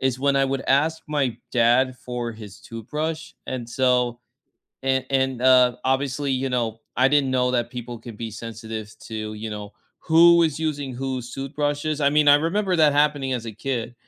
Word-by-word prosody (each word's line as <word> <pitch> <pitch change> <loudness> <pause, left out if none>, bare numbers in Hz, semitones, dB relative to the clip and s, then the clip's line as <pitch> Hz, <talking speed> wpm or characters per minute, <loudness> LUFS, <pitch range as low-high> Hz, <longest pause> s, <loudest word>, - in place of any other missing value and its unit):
is 130 -1 0
when 140 +1 +2
I 135 - +3
would 135 0 -2
ask 160 +4 +2
my 140 -6 -1 0.2
dad 125 +2 +3
for 120 -2 -5
his 105 -3 -11
toothbrush, 155 +8 -5
and 125 -3 -5
so 125 -1 +1 0.6
and 130 0 +1
and, 130 -2 0
um, 125 -1 +5
obviously, 135 +1 0
you 130 0 -1
know, 115 -3 -2 0.2
I 130 +2 +4
didn't 145 -2 +2
know 125 -1 +2
that 120 -1 0
people 120 -1 -7
could 115 -2 -10
be 115 -1 -5
sensitive 110 -1 -7
to, 110 -1 -5
you 110 +1 -6
know, 105 -1 -7 0.3
who 170 +1 +6
is 155 -3 0
using 145 -4 -2
whose 130 -1 -4
toothbrushes, 145 +2 -2
I 140 - +4
mean, 150 0 +4
I 145 - +9
remember 185 +4 0
that 155 -3 +5
happening 145 -2 +1
as 115 -2 -3
a 110 - -5
kid. 120 +1 -4
130 Hz, 185 wpm, -23 LUFS, 120-145 Hz, 0.6 s, I